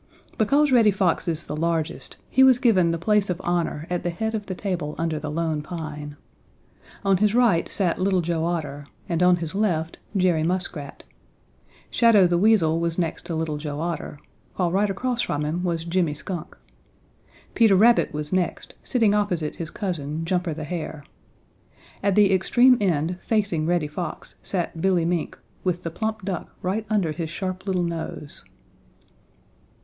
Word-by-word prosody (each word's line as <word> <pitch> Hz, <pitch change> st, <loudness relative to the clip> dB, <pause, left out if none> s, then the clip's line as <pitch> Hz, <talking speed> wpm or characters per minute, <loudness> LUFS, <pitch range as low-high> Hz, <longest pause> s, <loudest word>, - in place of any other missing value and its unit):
Because 280 Hz, +7 st, +3 dB
Reddy 230 Hz, -4 st, +6 dB
Fox 190 Hz, -3 st, +1 dB
is 165 Hz, 0 st, -1 dB
the 150 Hz, -, -5 dB
largest 165 Hz, 0 st, -2 dB
he 265 Hz, -, +4 dB
was 260 Hz, -2 st, +7 dB
given 215 Hz, -10 st, +3 dB
the 165 Hz, -, 0 dB
place 205 Hz, +3 st, +2 dB
of 180 Hz, -1 st, -2 dB
honor 170 Hz, -3 st, -1 dB
at 180 Hz, -1 st, -2 dB
the 175 Hz, -, -2 dB
head 220 Hz, +6 st, -3 dB
of 210 Hz, -2 st, -4 dB
the 185 Hz, -, -4 dB
table 180 Hz, -6 st, -3 dB
under 165 Hz, -2 st, -1 dB
the 150 Hz, 0 st, -5 dB
Lone 160 Hz, -1 st, -1 dB
Pine. 150 Hz, -3 st, -7 dB, 0.9 s
On 195 Hz, -1 st, +4 dB
his 210 Hz, +3 st, +2 dB
right 230 Hz, -9 st, +3 dB
sat 185 Hz, -4 st, 0 dB
Little 190 Hz, -1 st, +2 dB
Joe 165 Hz, -1 st, -1 dB
Otter 150 Hz, -4 st, -3 dB, 0.2 s
and 170 Hz, 0 st, -1 dB
on 180 Hz, 0 st, +6 dB
his 165 Hz, -1 st, -5 dB
left 175 Hz, -6 st, -1 dB, 0.2 s
Jerry 180 Hz, -4 st, +3 dB
Muskrat. 165 Hz, -4 st, -3 dB, 0.9 s
Shadow 230 Hz, -5 st, +5 dB
the 175 Hz, -1 st, +2 dB
Weasel 180 Hz, -6 st, +4 dB
was 170 Hz, 0 st, -1 dB
next 170 Hz, -3 st, -2 dB
to 170 Hz, -, -3 dB
Little 160 Hz, -2 st, -2 dB
Joe 145 Hz, -1 st, -5 dB
Otter, 165 Hz, -3 st, -4 dB, 0.4 s
while 180 Hz, -3 st, 0 dB
right 200 Hz, +3 st, +2 dB
across 240 Hz, +5 st, -1 dB
from 145 Hz, +1 st, -1 dB
him 165 Hz, +4 st, -2 dB
was 170 Hz, -2 st, -1 dB
Jimmy 170 Hz, -3 st, 0 dB
Skunk. 175 Hz, +2 st, -6 dB, 1.0 s
Peter 225 Hz, -4 st, +5 dB
Rabbit 230 Hz, +5 st, +5 dB
was 150 Hz, +2 st, -4 dB
next, 185 Hz, -2 st, -1 dB
sitting 225 Hz, -6 st, +2 dB
opposite 180 Hz, -7 st, -1 dB
his 165 Hz, -2 st, -4 dB
cousin, 160 Hz, -4 st, -4 dB
Jumper 175 Hz, -2 st, -1 dB
the 155 Hz, -, -5 dB
Hare. 155 Hz, -2 st, -5 dB, 1.0 s
At 200 Hz, -1 st, +1 dB
the 205 Hz, -2 st, +5 dB
extreme 240 Hz, +7 st, +5 dB
end, 175 Hz, -1 st, 0 dB
facing 200 Hz, -8 st, 0 dB
Reddy 175 Hz, -2 st, +1 dB
Fox, 155 Hz, +2 st, -6 dB
sat 175 Hz, -3 st, -3 dB
Billy 180 Hz, -3 st, +2 dB
Mink, 170 Hz, -1 st, -2 dB, 0.3 s
with 180 Hz, -1 st, -1 dB
the 165 Hz, -, -4 dB
plump 220 Hz, +2 st, -3 dB
duck 190 Hz, -3 st, -4 dB
right 205 Hz, +4 st, -2 dB
under 200 Hz, -7 st, +1 dB
his 160 Hz, 0 st, -4 dB
sharp 185 Hz, +3 st, -5 dB
little 185 Hz, -2 st, +1 dB
nose. 165 Hz, -3 st, -5 dB
175 Hz, 170 wpm, -24 LUFS, 160-195 Hz, 1.0 s, was